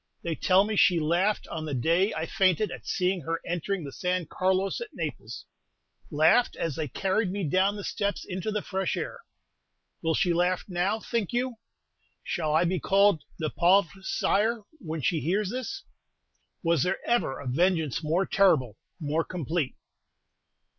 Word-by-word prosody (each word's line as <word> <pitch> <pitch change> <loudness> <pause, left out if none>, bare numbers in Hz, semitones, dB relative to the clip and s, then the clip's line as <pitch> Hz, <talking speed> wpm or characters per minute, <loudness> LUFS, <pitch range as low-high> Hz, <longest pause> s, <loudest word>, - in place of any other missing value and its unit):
They 170 - -1
tell 185 +4 +4
me 215 +1 -2
she 180 -3 +5
laughed 175 +7 +1
on 160 -1 -4
the 145 -3 -3
day 170 - +2
I - - -2
fainted 190 -1 +2
at - - -9
seeing 185 0 0
her 165 +3 -2
entering 175 +2 -2
the 140 - -6
San 180 +3 -1
Carlos 190 - 0
at 475 - -4
Naples, - - -5 0.6
laughed 160 +10 +4
as 165 -5 -2
they 155 -1 -2
carried 190 - 0
me 200 0 -3
down 190 +6 +2
the 205 - -6
steps 200 +1 -2
into 185 +2 -4
the 210 -1 -2
fresh 190 -2 -2
air! - - -4 0.8
Will 160 -1 +1
she 175 - +2
laugh 180 +1 +1
now, 190 +4 0
think 230 -2 -2
you? 245 0 -1 0.7
Shall 155 -4 -2
I 160 - +4
be 180 +1 0
called 195 -1 +3 0.2
'Le 155 -2 -2
Pauvre 185 +1 +3
Sire' 215 +4 +1 0.2
when 160 - -5
she 165 - +1
hears 195 +6 0
this? 390 +11 -5 0.8
Was 165 -4 +2
there 180 - +1
ever 235 - +1
a 140 - -8
vengeance 160 +2 +1
more 170 +5 +1
terrible, 145 - +2 0.2
more 155 +1 0
complete?" 165 -4 -2
180 Hz, 165 wpm, -27 LUFS, 160-200 Hz, 0.8 s, she